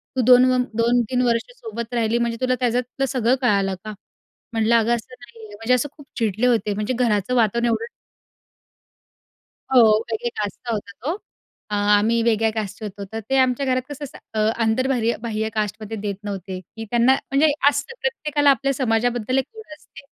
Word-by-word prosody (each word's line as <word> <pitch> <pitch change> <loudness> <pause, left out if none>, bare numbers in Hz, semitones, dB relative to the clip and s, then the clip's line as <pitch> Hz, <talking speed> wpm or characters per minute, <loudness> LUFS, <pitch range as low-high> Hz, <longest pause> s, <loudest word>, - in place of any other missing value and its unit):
तू 255 - +2
दोन 250 +1 +7
व 255 - +2 0.2
2-3 240 +1 +2
वर्ष 235 - 0
सोबत 250 - -7
राहिली 230 0 +1
म्हणजे 235 -1 -1
तुला 255 0 +2
त्याच्यातलं 250 +2 0
सगळं 255 -1 +1
कळालं 200 -6 +2
का?" 215 0 -6 0.6
म्हटलं, 225 +1 +2
"अगं 230 +1 +3
असं 235 +2 -9
नाहीये." 230 -3 -13
म्हणजे 225 +4 0
असं 260 +3 +1
खूप 290 - -13
चिडले 225 +1 +1
होते 225 -4 +1
म्हणजे 215 +5 -2
घराचं 235 -1 +1
वातावरण 235 +1 +2
एवढं 230 0 0 1.9
हो, 255 - +7 0.3
वेगळ्या 235 +2 -2
कास्टचा 210 +4 -4
होता 200 -1 -5
तो. 320 +5 0 0.6
अ, - - -1 0.2
आम्ही 230 +3 +2
वेगळ्या 225 -1 +2
कास्टचे 215 0 -5
होतो. 200 -1 -6
तर 225 - -3
ते 270 - +3
आमच्या 260 +1 +2
घरात 255 -1 +1
कसं 290 0 -7
असं 270 - -10 0.2
अ, - - -2 0.2
आंतरबाह्य 235 +1 +1
बाह्य 220 -2 -2
कास्टमध्ये 215 +1 -3
देत 200 -1 -3
नव्हते, 195 -2 -5
की 225 +5 -10
त्यांना 240 +2 +4
म्हणजे 285 +3 +2 0.2
असतं 290 +10 -2
प्रत्येकाला 300 -12 +2
आपल्या 275 0 +2
समाजाबद्दल 245 0 0
एक 265 - +1
ओढ 430 -8 -11
असते. - - -15
235 Hz, 175 wpm, -22 LUFS, 220-255 Hz, 1.9 s, दोन